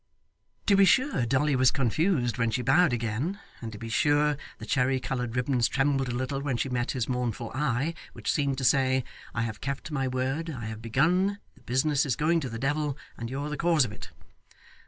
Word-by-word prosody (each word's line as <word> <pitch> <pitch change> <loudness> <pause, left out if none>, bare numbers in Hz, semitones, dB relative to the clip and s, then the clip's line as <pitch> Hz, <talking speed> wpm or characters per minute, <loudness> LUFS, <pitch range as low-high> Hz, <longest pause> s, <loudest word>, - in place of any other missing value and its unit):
To 200 - +5
be 195 - +6
sure 255 - +3
Dolly 140 +3 +2
was 130 0 +5
confused 135 - +1
when 115 -1 +2
she 125 +2 -1
bowed 155 +7 +4
again, 120 - -2 0.2
and 115 -2 -5
to 105 - -8
be 115 +2 -7
sure 145 +5 +2 0.2
the - - -8
cherry 130 0 +1
coloured 125 -2 -3
ribbons 125 -1 +2
trembled 135 -1 +1
a 120 - -2
little 130 +2 -2
when 135 -4 -1
she 135 - -1
met 120 -1 -1
his 125 -3 -1
mournful 120 -3 -2
eye, 135 +2 0 0.2
which - - -2
seemed 140 -2 0
to 135 - -3
say, 130 0 +3 0.3
'I 115 - 0
have 110 -2 -5
kept 140 +3 -4
my 135 -3 0
word, 130 +6 -2
I 125 -8 -5
have 110 0 -6
begun, 175 - +2 0.2
the - - -23
business 130 +3 +1
is 135 -5 0
going 165 +3 +2
to 135 -5 -4
the 115 - -5
devil, 145 +2 -1 0.2
and 115 0 -6
you're 140 +3 -3
the 150 - -3
cause 165 -5 +3
of 110 - -6
it. 105 - -10
135 Hz, 210 wpm, -28 LUFS, 120-150 Hz, 0.3 s, be